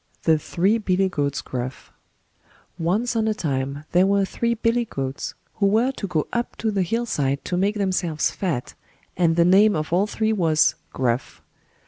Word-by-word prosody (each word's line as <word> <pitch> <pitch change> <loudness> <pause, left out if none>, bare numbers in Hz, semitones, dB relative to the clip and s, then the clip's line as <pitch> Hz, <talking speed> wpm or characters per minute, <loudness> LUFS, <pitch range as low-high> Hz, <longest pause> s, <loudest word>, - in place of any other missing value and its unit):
THE 160 -2 +4
THREE 195 +9 +1
BILLY 190 -2 +1
GOATS 145 -5 -1
GRUFF 130 0 -6 0.9
Once 205 +9 0
on 220 -1 +1
a 215 - +1
time 140 -3 -2
there 180 +2 +4
were 200 0 +3
three 235 +4 -1
Billy 230 +1 +1
goats, 135 - -5 0.2
who 200 - +3
were 225 +6 +3
to 215 -6 -5
go 160 -4 0
up 240 0 -2
to 220 - -1
the 200 -2 0
hill 230 +7 -1
side 140 - -1
to 180 - -2
make 200 +4 +1
themselves 185 -6 0
fat, 160 -11 -3 0.4
and 165 -2 +2
the 170 0 +4
name 200 +4 +5
of 155 +1 -3
all 190 +4 +3
three 220 +1 0
was 160 -6 +3 0.2
"Gruff". 125 -1 -2
185 Hz, 175 wpm, -23 LUFS, 155-215 Hz, 0.9 s, name